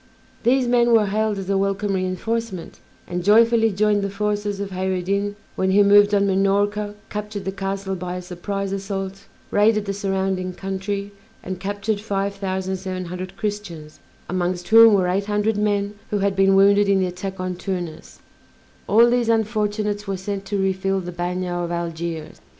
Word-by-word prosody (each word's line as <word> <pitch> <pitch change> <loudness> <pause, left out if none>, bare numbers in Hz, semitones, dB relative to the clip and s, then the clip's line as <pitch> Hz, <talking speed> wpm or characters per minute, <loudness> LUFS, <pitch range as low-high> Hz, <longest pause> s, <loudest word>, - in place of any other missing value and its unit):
These 250 +2 +3
men 240 -1 +3
were 220 -2 +5
hailed 215 +1 0
as 195 -1 -5
a 195 0 +1
welcome 195 +1 0
reinforcement, 190 +1 -3 0.3
and 180 0 -4
joyfully 225 +3 +5
joined 205 +1 +2
the 200 - -2
forces 205 0 -2
of 200 -1 -4
Kheyr 185 0 -1
ed 180 - -5
Din 200 +1 -1 0.2
when 190 - 0
he 200 +2 +5
moved 205 0 +6
on 200 0 +3
Minorca, 205 +2 +1 0.2
captured 210 -1 -5
the 195 - -1
castle 195 0 -3
by 180 -1 -4
a 180 - -4
surprise 195 +2 -4
assault, 195 0 -4 0.3
raided 210 0 +3
the 200 - -2
surrounding 190 -2 -1
country, 195 +2 -4 0.3
and 185 0 -5
captured 205 +2 -2
five 200 -2 -2
thousand 190 -1 -3
seven 185 -1 -5
hundred 180 +1 -7
Christians, 170 -8 -5 0.3
amongst 180 -1 -2
whom 225 -1 +8
were 185 -2 +2
eight 190 +3 0
hundred 210 +1 +1
men 205 -1 0 0.2
who 210 - 0
had 200 -1 0
been 195 0 +4
wounded 200 +1 +5
in 195 -1 +4
the 185 - +2
attack 185 +1 -5
on 185 0 -2
Tunis 175 -4 -6 0.7
all 230 +4 +6
these 240 -1 +1
unfortunates 210 -2 0
were 195 -1 -2
sent 195 +1 -4
to 205 - -2
refill 195 0 0
the 180 -1 -6
bagnio 175 0 -2
of 170 - -4
Algiers. 170 -2 -4
195 Hz, 175 wpm, -22 LUFS, 185-205 Hz, 0.7 s, whom